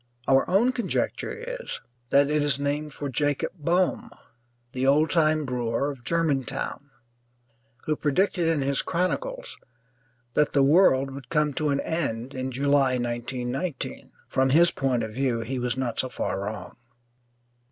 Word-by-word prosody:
Our 135 0 +4
own 220 +7 +4
conjecture 245 -2 -2 0.3
is - - -6 0.3
that 140 +1 +4
it 150 0 +2
is 145 -3 +2
named 145 +2 -2
for 145 +1 -5
Jacob 145 +2 0
Boehm, 185 +7 0 0.6
the 130 +1 -1
oldtime 155 +1 +3
brewer 125 +2 -1
of 130 -4 -12
Germantown, 145 -3 -1 1.0
who 155 - +1
predicted 170 +4 +1
in 160 -4 +1
his 140 0 +1
chronicles - - -2 0.8
that 150 - +2
the 140 - +4
world 135 -3 +4
would 135 -2 -9
come 150 -2 +1
to 150 +2 0
an 140 0 +1
end 135 -6 -2
in 130 0 -3
July, 135 0 +2
1919. 125 +5 -4 0.2
From 130 0 +1
his 170 +5 +5
point 130 -4 0
of 110 -1 -5
view 125 -2 0
he 125 +3 -3
was 125 0 -1
not 125 -4 -2
so 130 - +1
far 95 - -3
wrong. 110 +4 -7
140 Hz, 145 wpm, -26 LUFS, 130-155 Hz, 1.0 s, his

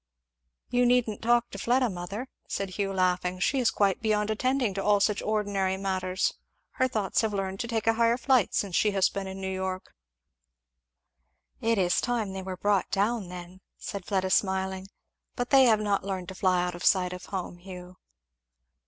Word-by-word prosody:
"You 245 0 +3
needn't 240 -4 +1
talk 240 +1 +2
to 200 - -7
Fleda, 250 +4 +2
mother," 195 +5 -5 0.2
said 195 -1 -3
Hugh 195 +1 -2
laughing, 180 -1 0
"she 265 +9 +1
is 245 - +3
quite 200 -2 +1
beyond 215 -1 +1
attending 255 -1 0
to 195 +1 -3
all 205 -1 +4
such 205 0 +1
ordinary 200 -3 0
matters 190 -1 -1 0.4
her 260 - +1
thoughts 215 -6 0
have 220 -2 -1
learned 195 0 -3
to 235 - -2
take 230 -2 -2
a 225 - +4
higher 230 +1 +2
flight 255 -5 +2
since 195 -4 -1
she 215 - +3
has 195 -2 +3
been 195 -1 -5
in 190 0 -7
New 190 0 -3
York." 190 0 -4 1.7
"It 230 0 +2
is 180 -2 +2
time 225 -5 -1
they 190 - -5
were 185 -1 -6
brought 205 0 +1
down 205 -1 0
then," 180 +1 -9 0.2
said 200 -2 -6
Fleda 190 -1 -1
smiling; 190 -1 0 0.5
"but 245 -1 -3
they 270 -1 +7
have 220 -3 +4
not 205 -2 0
learned 190 -3 -4
to - - -6
fly 185 -1 +2
out 180 - -3
of 175 - -8
sight 180 -2 +3
of 180 0 -8
home, 180 -2 -5
Hugh." 180 0 -10
195 Hz, 190 wpm, -28 LUFS, 185-220 Hz, 1.7 s, they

